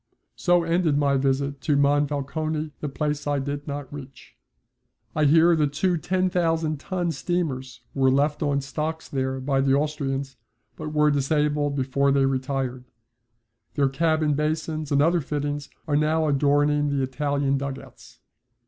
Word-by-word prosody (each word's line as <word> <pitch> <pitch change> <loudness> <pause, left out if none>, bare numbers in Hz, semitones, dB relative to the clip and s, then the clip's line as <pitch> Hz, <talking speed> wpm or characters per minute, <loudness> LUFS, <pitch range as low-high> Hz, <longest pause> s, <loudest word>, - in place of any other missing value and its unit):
So 175 -1 +2
ended 165 -3 +1
my 140 -1 +2
visit 135 +1 0
to 150 - +1
Monfalcone, 145 +2 0
the 150 - -3
place 150 +1 -2
I 145 0 +1
did 140 +2 -4
not 145 -1 -5
reach. 135 -2 -11 0.8
I 155 - +2
hear 165 +3 +5
that 150 -3 +1
two 180 +4 +1
10,000 165 -3 0
ton 175 +1 -2
steamers 135 -6 -3
were 135 -1 +3
left 145 +3 +1
on 145 -2 +1
the 140 - 0
stocks 155 +3 -4
there 130 -1 -2
by 135 0 0
the 135 0 +3
Austrians, 140 -2 -2 0.4
but 155 -1 -6
were 150 0 +3
disabled 145 0 +1
before 140 +1 +1
they 135 -1 +3
retired. 130 -1 -2 0.9
Their 140 -2 +2
cabin 155 +1 +1
basins 155 0 -2
and 140 0 +4
other 170 +2 +3
fittings 145 0 -3 0.2
are 145 - +1
now 155 +1 +2
adorning 145 +1 +2
the 140 -1 0
Italian 140 +1 0
dug 140 -1 -4
outs. - - -15
145 Hz, 150 wpm, -24 LUFS, 140-155 Hz, 0.9 s, hear